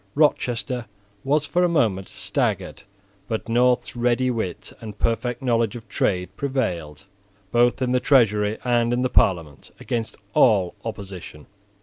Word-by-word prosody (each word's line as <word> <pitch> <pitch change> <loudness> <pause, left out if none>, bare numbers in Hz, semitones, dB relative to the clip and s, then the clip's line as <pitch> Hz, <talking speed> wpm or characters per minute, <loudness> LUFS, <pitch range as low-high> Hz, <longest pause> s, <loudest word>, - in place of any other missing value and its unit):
Rochester 125 -5 +1 0.4
was 145 +2 +1
for 180 +4 +1
a 175 - +3
moment 100 - +1
staggered; - - -2 0.5
but 110 -1 -3
North's 125 +2 +2
ready 120 +1 +1
wit 110 -7 -4
and 105 -2 -8
perfect 120 +3 -1
knowledge 115 -3 +1
of 120 -1 -9
trade 90 -2 -1
prevailed, 90 - -3 0.5
both 120 +2 +3
in 125 - 0
the 125 - +3
Treasury 105 -6 +3
and 120 -1 +2
in 125 +1 +1
the 130 - +1
Parliament, 80 -6 +1
against 115 -2 -3 0.2
all 100 -7 +4
opposition. 95 -8 -8
115 Hz, 135 wpm, -23 LUFS, 105-125 Hz, 0.5 s, all